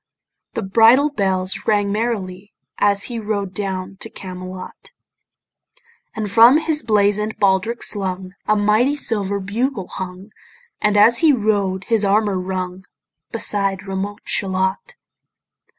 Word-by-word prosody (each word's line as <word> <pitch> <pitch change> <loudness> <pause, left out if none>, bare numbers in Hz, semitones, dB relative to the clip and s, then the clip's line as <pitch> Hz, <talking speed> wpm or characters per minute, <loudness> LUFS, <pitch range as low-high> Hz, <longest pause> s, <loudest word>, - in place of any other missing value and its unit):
The - - -2
bridle 230 +9 +4
bells 190 -6 0
rang 205 -1 +2
merrily 205 -3 -3 0.3
As 200 0 +2
he 240 -2 -5
rode 205 -3 -3
down 190 -1 -4
to - - -8
Camelot: 185 0 -9 1.3
And 215 -3 -3
from 235 +6 +7
his 315 -1 0
blazon'd 210 0 +1
baldric 200 +4 +1
slung 185 -2 -1
A 215 - +3
mighty 215 +7 +2
silver 200 -7 -1
bugle 205 +1 -3
hung, 185 +2 -8 0.5
And 210 0 +2
as 225 +3 +6
he 320 -3 +5
rode 205 -6 0
his 225 -1 +1
armour 200 -1 +1
rung, 185 0 -5 0.5
Beside 200 -4 +1
remote 195 +2 -5
Shalott. 190 - -1
205 Hz, 120 wpm, -19 LUFS, 190-220 Hz, 1.3 s, from